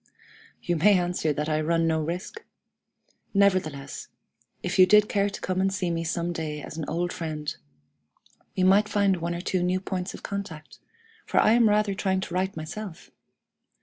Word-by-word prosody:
You 175 Hz, -1 st, 0 dB
may 200 Hz, +5 st, +5 dB
answer 175 Hz, -3 st, 0 dB
that 150 Hz, +1 st, -2 dB
I 155 Hz, 0 st, +1 dB
run 165 Hz, +1 st, +1 dB
no 160 Hz, -1 st, +1 dB
risk! 180 Hz, -, -5 dB, 0.9 s
Nevertheless, 180 Hz, -9 st, +1 dB, 0.6 s
if 185 Hz, +2 st, -2 dB
you 185 Hz, -, +9 dB
did 210 Hz, +1 st, +6 dB
care 200 Hz, -1 st, +1 dB
to 200 Hz, -, -8 dB
come 185 Hz, 0 st, -1 dB
and 195 Hz, 0 st, +2 dB
see 190 Hz, -3 st, -1 dB
me 165 Hz, 0 st, -1 dB
some 170 Hz, +1 st, -2 dB
day 155 Hz, -2 st, -4 dB
as 150 Hz, -, -8 dB
an 160 Hz, -2 st, -4 dB
old 175 Hz, +2 st, -1 dB
friend, 155 Hz, -3 st, -4 dB, 1.0 s
we 185 Hz, -, +2 dB
might 200 Hz, +3 st, +5 dB
find 200 Hz, -2 st, +2 dB
one 170 Hz, +1 st, -3 dB
or 170 Hz, -, -4 dB
two 185 Hz, 0 st, -1 dB
new 180 Hz, +1 st, +1 dB
points 185 Hz, -1 st, -4 dB
of -, -, -12 dB
contact, 195 Hz, -6 st, -6 dB, 0.5 s
for -, -, +2 dB
I -, -, +5 dB
am 230 Hz, -1 st, +5 dB
rather 210 Hz, -1 st, +2 dB
trying 190 Hz, -1 st, 0 dB
to 175 Hz, -, -6 dB
write 190 Hz, 0 st, -1 dB
myself! 165 Hz, +3 st, -7 dB
180 Hz, 180 wpm, -26 LUFS, 165-195 Hz, 1.0 s, you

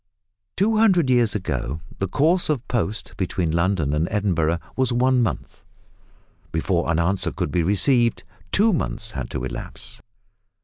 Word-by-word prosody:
Two 215 Hz, +4 st, +2 dB
hundred 180 Hz, -11 st, +4 dB
years 120 Hz, -4 st, +3 dB
ago 75 Hz, -7 st, -3 dB, 0.2 s
the 95 Hz, -, 0 dB
course 160 Hz, -, +2 dB
of 135 Hz, -5 st, -1 dB
post 110 Hz, -3 st, -2 dB
between 90 Hz, -3 st, -1 dB
London 85 Hz, -3 st, +1 dB
and 75 Hz, +3 st, +1 dB
Edinburgh 85 Hz, -6 st, +1 dB, 0.2 s
was 130 Hz, -1 st, +1 dB
one 125 Hz, +1 st, +3 dB
month; 115 Hz, -, -3 dB, 0.9 s
before 85 Hz, +1 st, 0 dB
an 85 Hz, -, +2 dB
answer 90 Hz, +3 st, 0 dB
could -, -, -3 dB
be 85 Hz, -, +1 dB
received 115 Hz, -, +2 dB, 0.3 s
two 215 Hz, +1 st, +4 dB
months 115 Hz, -8 st, -1 dB
had 65 Hz, -, -5 dB
to -, -, -4 dB
elapse! -, -, -7 dB
100 Hz, 145 wpm, -23 LUFS, 85-130 Hz, 0.9 s, hundred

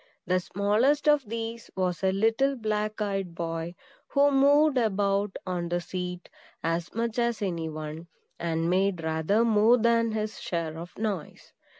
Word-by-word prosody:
The 185 Hz, 0 st, +2 dB
smallest 210 Hz, +11 st, +1 dB
of 290 Hz, -7 st, +3 dB
these 230 Hz, 0 st, -5 dB
was 180 Hz, -3 st, -1 dB
a 190 Hz, -, +3 dB
little 225 Hz, +8 st, +2 dB
black 215 Hz, -2 st, -2 dB
eyed 195 Hz, -4 st, -3 dB
boy, 165 Hz, +1 st, -4 dB, 0.3 s
who 285 Hz, 0 st, +3 dB
moved 285 Hz, +2 st, +5 dB
about 200 Hz, -3 st, +1 dB
on 175 Hz, -2 st, -2 dB
the 175 Hz, 0 st, 0 dB
seat 180 Hz, 0 st, -5 dB, 0.4 s
as 165 Hz, +2 st, -2 dB
much 230 Hz, 0 st, -1 dB
as 235 Hz, -1 st, +1 dB
any 170 Hz, -5 st, -2 dB
one, 155 Hz, +2 st, -7 dB, 0.3 s
and 165 Hz, -1 st, -1 dB
made 185 Hz, -1 st, +1 dB
rather 160 Hz, +8 st, +1 dB
more 225 Hz, +2 st, +5 dB
than 230 Hz, -1 st, +2 dB
his 215 Hz, 0 st, -3 dB
share 165 Hz, -2 st, -3 dB
of 170 Hz, +2 st, -9 dB
noise. 205 Hz, -7 st, -4 dB
200 Hz, 155 wpm, -27 LUFS, 175-230 Hz, 0.4 s, moved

